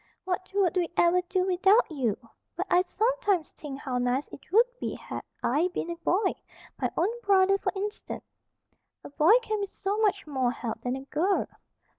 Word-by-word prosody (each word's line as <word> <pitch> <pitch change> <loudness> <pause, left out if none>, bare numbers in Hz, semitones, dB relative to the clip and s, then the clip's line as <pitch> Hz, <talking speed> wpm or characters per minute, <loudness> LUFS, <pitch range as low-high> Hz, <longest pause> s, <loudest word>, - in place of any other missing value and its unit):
"What 370 0 -3
would 380 -2 +2
we 350 -2 +1
ever 345 +1 +4
do 370 +1 0
without 385 +4 +4
you? 245 -9 0 0.4
But 365 +3 -2
I 355 - +6
sometimes 415 -3 0
think 280 -3 -8
how 255 -3 -2
nice 250 +3 0
it 280 - -13
would 450 +5 +6
be - - -3
had - - -6 0.2
I 300 +8 +2
been 340 - -2
a - - -3
boy, 375 +4 +1 0.5
my - - +1
own 450 +8 0
brother, 390 -2 +4
for - - -1
instance. 415 +2 -5 0.8
A - - -10
boy 320 +10 +6
can 430 -1 -2
be 400 - -2
so 395 +2 -3
much 405 -2 +1
more 265 -5 0
help 240 -2 -4
than 250 +1 -2
a 265 - -6
girl." 350 +8 +1
365 Hz, 185 wpm, -28 LUFS, 300-400 Hz, 0.8 s, I